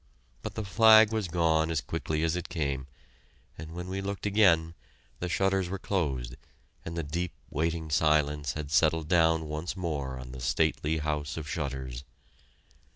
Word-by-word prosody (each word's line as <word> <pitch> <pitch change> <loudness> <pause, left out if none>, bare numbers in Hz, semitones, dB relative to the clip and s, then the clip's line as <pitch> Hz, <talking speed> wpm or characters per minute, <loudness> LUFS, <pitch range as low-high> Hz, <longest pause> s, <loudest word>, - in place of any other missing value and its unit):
But - - -6
the 110 - -3
flag 110 +2 +7
was 110 -4 -1
gone 80 -2 +2
as 80 -2 0
quickly 75 +3 -2
as 80 +1 +1
it 90 - -4
came, 70 -5 -2 0.7
and 80 +1 -9
when 90 +1 -6
we 95 +1 -3
looked 100 +1 -4
again, 90 -6 +4 0.5
the 90 - -3
shutters 95 0 +1
were 95 - -3
closed 70 -11 -2 0.5
and 85 +1 -6
the 85 - -1
deep, 85 +4 -3 0.2
waiting 80 +1 -1
silence 75 -2 +2
had 75 -2 -6
settled 80 +1 +3
down 80 -2 +3
once 75 +5 -4
more 70 -7 -3
on 65 0 -8
the 65 - -8
stately 75 +5 +1
house 75 -2 -2
of 75 -2 -5
shutters. 65 -4 -4
80 Hz, 160 wpm, -29 LUFS, 75-90 Hz, 0.7 s, flag